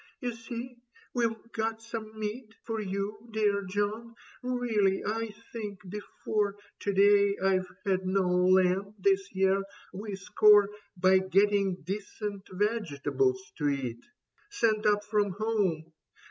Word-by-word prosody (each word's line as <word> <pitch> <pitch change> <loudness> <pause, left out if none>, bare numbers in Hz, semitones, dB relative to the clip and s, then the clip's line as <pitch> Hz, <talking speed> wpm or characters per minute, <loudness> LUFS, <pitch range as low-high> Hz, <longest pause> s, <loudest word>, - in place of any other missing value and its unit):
" - - -41
You 245 -3 -2
see 240 +1 -7 0.3
we've 230 -1 -1
got 225 0 -2
some 225 -1 -7
meat 220 +1 -5
For 225 -1 -3
you, 205 +3 -4
dear 210 -2 +2
John. 205 +4 -2 0.3
Really, 235 -6 +1
I 225 +1 -1 0.2
think 205 -5 -6
before 210 +1 -2 0.2
To 200 - -1
day 200 0 +5
I've 185 -1 +1 0.2
had 190 -1 0
no 190 0 +2
lamb 185 +2 +3
this 195 0 +2
year. 190 +1 +3 0.3
We 205 +1 -5
score 205 +1 +5 0.3
By 185 +1 +5
getting 195 0 +2
decent 200 +2 -5
vegetables 140 - 0
to 145 -1 +2
eat. 125 -4 -3 0.5
Sent 220 - +1
up 205 0 +3
from 205 -2 +1
home. 190 -7 -1
205 Hz, 130 wpm, -29 LUFS, 190-220 Hz, 0.5 s, day